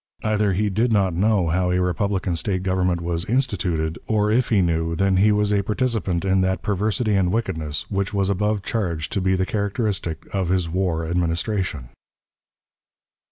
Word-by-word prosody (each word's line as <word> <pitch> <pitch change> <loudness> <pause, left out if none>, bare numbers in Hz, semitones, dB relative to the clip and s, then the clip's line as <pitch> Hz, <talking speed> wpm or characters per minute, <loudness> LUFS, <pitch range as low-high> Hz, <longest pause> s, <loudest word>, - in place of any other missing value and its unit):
Either 105 -2 +1
he 105 +3 +1
did 110 +5 +1
not 100 -4 +2
know 95 -1 +2
how 90 +2 +1
a 90 0 +1
republican 95 0 0
State 95 +2 -2
government 90 -2 0
was 85 0 -2
"instituted," 90 -10 -1
or, 105 -1 +2
if 120 +3 +2
he 110 - +3
knew, 85 -2 0
then 95 +1 +2
he 105 +3 +5
was 105 0 +2
a 100 - +3
participant 105 -4 -1
in 95 0 +3
that 95 -1 0
perversity 105 +2 0
and 95 -3 +2
wickedness, 80 -9 -2
which 100 0 -1
was 100 -2 0
above 105 +1 0
charged 85 -10 -2
to 100 - -1
be 95 0 +2
the 95 0 0
characteristic 100 -5 -2
of 95 -3 -1
his 90 -2 +1
war 85 -2 -1
Administration. 85 - -1
95 Hz, 170 wpm, -22 LUFS, 90-105 Hz, -, he